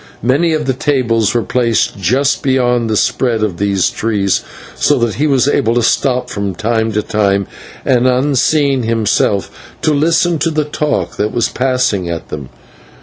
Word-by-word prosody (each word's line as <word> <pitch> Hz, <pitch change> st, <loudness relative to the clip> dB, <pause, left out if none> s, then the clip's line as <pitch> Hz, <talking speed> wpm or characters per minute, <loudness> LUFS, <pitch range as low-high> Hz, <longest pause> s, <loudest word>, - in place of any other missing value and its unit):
Many 145 Hz, +7 st, +2 dB
of 155 Hz, -1 st, -1 dB
the 130 Hz, -, +1 dB
tables 120 Hz, -5 st, 0 dB
were 120 Hz, -, +1 dB
placed 115 Hz, 0 st, 0 dB
just 130 Hz, +10 st, +1 dB
beyond 125 Hz, -4 st, +1 dB
the 110 Hz, -, +1 dB
spread 115 Hz, -2 st, 0 dB
of 95 Hz, -6 st, -2 dB
these 100 Hz, -1 st, +1 dB
trees, 100 Hz, -4 st, 0 dB, 0.3 s
so -, -, +1 dB
that 115 Hz, -2 st, 0 dB
he 150 Hz, +7 st, 0 dB
was 135 Hz, -2 st, +2 dB
able 115 Hz, -5 st, +1 dB
to 120 Hz, -, +2 dB
stop 125 Hz, +1 st, +1 dB
from 100 Hz, -2 st, -4 dB
time 110 Hz, +1 st, -1 dB
to 105 Hz, +1 st, 0 dB
time 100 Hz, -2 st, 0 dB, 0.4 s
and, 125 Hz, -1 st, +3 dB
unseen 135 Hz, +1 st, +2 dB
himself, 110 Hz, -3 st, 0 dB, 0.3 s
to 155 Hz, -, +2 dB
listen 165 Hz, +2 st, +2 dB
to 160 Hz, +3 st, +1 dB
the 155 Hz, -2 st, -1 dB
talk 150 Hz, 0 st, -2 dB
that 105 Hz, -, -1 dB
was 120 Hz, -1 st, 0 dB
passing 125 Hz, -8 st, 0 dB
at 85 Hz, -1 st, -5 dB
them. 70 Hz, -4 st, -7 dB
120 Hz, 170 wpm, -15 LUFS, 105-140 Hz, 0.4 s, and